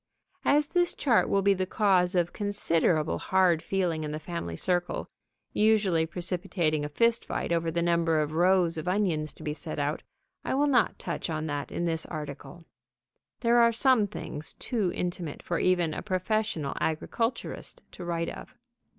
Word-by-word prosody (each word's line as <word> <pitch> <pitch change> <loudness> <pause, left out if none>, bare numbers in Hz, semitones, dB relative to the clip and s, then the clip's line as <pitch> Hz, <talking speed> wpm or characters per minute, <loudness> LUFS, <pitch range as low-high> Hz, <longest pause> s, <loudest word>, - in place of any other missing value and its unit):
As 295 +1 +3
this 350 -1 +1
chart 245 -6 +3
will 195 0 +2
be 200 0 +5
the 185 -1 -2
cause 190 -3 +2
of 175 -1 +1
considerable 165 - +1
hard 185 -4 +3
feeling 175 -5 -1
in 150 - -3
the 155 - -4
family 155 - -5
circle, 175 - -1 0.5
usually 205 -7 +3
precipitating 175 -3 -1
a 150 - -3
fist 230 +9 +2
fight - - -3
over 165 -1 +1
the 170 +1 0
number 170 -2 +2
of 150 0 -1
rows 175 0 +3
of 155 - -6
onions 180 -6 0
to - - -13
be 150 - -2
set 155 +1 -7
out, 145 +1 -1 0.4
I - - -1
will 285 +2 +3
not 255 -6 +3
touch - - -4
on 155 -1 -2
that 145 -2 -3
in 175 - -2
this 165 -1 -1
article. 155 +2 -7 0.8
There 235 0 +4
are 235 0 +6
some 235 -2 +3
things 155 -5 -6
too 215 -8 -1
intimate 175 -4 -4
for 170 - -1
even 175 -3 +2
a - - -4
professional 185 -5 -1
agriculturist 230 +9 -2
to 180 - -9
write 170 -1 -2
of. 255 - -10
175 Hz, 170 wpm, -28 LUFS, 160-205 Hz, 0.8 s, are